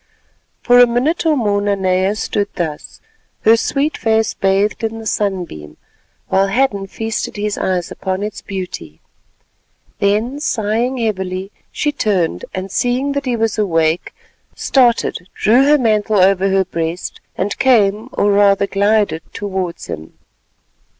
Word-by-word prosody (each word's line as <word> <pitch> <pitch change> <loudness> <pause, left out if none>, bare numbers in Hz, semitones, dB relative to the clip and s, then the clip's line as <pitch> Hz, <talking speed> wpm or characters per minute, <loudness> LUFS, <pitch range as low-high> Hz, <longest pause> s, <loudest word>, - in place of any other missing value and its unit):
For 245 0 +5
a 245 - +8
minute 270 +9 0
or 310 -2 +3
more 205 -4 +1
Nanea 190 -1 +1
stood 205 -1 -1
thus, 160 -4 -5 0.4
her 225 +1 +6
sweet 280 +6 0
face 220 -1 +1
bathed 195 +3 0
in 225 0 -2
the 225 - -8
sunbeam, 180 - -3 0.5
while 195 +1 +2
Hadden 200 -3 0
feasted 225 +3 -4
his 210 0 -2
eyes 180 -2 -2
upon 190 +1 -3
its 210 - -5
beauty. 180 - -7 1.0
Then 215 +7 0
sighing 235 -1 -1
heavily, 190 -4 -3 0.2
she 295 - -1
turned, 185 - -1
and 190 0 -5
seeing 250 +5 0
that 280 0 -2
he 250 -2 0
was 225 -1 -1
awake, 165 -4 +1 0.4
started, 240 -8 +1
drew 245 +6 +4
her 295 +1 +5
mantle 215 -4 +1
over 195 +1 +4
her 190 0 +2
breast 170 0 -4 0.2
and 200 +2 -1
came, 220 -3 +3
or 205 - +2
rather 200 0 +4
glided, 200 -4 +1
towards 190 -4 -4
him. 80 +1 -8
205 Hz, 135 wpm, -17 LUFS, 190-230 Hz, 1.0 s, a